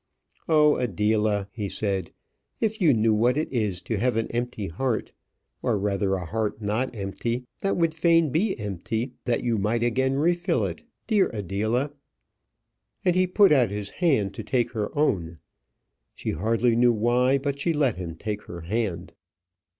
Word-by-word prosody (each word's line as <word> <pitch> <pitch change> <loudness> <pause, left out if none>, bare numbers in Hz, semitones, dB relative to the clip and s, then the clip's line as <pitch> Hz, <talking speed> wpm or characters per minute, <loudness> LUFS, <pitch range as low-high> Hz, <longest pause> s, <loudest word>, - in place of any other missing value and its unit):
"Oh! 150 -2 +5
Adela," 105 -2 +1
he 105 -3 -4
said, 95 -5 -2 0.5
"if 220 -1 -1
you 165 -5 +6
knew 110 -2 +3
what 120 +5 +2
it 155 -2 -2
is 105 -7 -1
to 110 -4 -2
have 125 0 +1
an 115 - -1
empty 120 -3 -3
heart 115 +7 -2 0.5
or - - +1
rather 100 -1 0
a 90 -2 -4
heart 110 +3 -2
not 110 +5 -2
empty 115 +5 -3
that 195 - 0
would 165 -2 +2
fain 165 -2 +3
be 190 - +1
empty 110 +5 -3
that 120 - 0
you 115 -3 +1
might 115 +4 0
again 130 +3 +1
refill 175 +4 +1
it. - - -5 0.2
Dear 210 -4 +3
Adela!" 110 - -1 1.1
And 180 -1 +3
he 185 0 +3
put 195 +1 +5
out 130 -7 +4
his 100 0 -5
hand 130 - +2
to 110 - -6
take 120 +1 0
her 105 -3 -2
own. 85 - 0 0.8
She - - -3
hardly 115 +7 +1
knew 120 0 +4
why, 120 +4 +2
but 140 0 -3
she 165 +4 +1
let 140 - +1
him 85 -3 -5
take 105 +4 -5
her 85 0 -8
hand. 100 +1 -3
115 Hz, 165 wpm, -25 LUFS, 105-140 Hz, 1.1 s, you